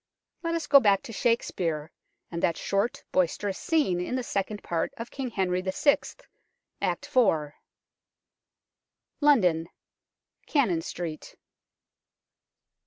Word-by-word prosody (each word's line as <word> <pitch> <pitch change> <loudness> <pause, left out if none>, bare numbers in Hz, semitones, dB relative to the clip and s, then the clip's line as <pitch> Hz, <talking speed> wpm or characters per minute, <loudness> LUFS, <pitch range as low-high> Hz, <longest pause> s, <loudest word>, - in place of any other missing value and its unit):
Let 335 -1 -1
us 330 -2 -2
go 285 -1 +8
back 200 -5 +3
to 230 - -8
Shakespeare, 170 -10 0 0.4
and 170 -1 -3
that 165 - +1
short, 200 +4 -1
boisterous 185 +2 0
scene 290 - +1
in 180 - -2
the 255 - -1
Second 205 -1 -3
Part 170 -1 -1
of 230 +1 -7
King 270 -2 -4
Henry 185 -4 0
VI., 190 +10 +3 0.8
Act - - -1
iv. 160 - +3 1.7
London. 180 - +3 0.8
Cannon 220 - +2
Street. 165 -2 -6
195 Hz, 110 wpm, -27 LUFS, 170-250 Hz, 1.7 s, go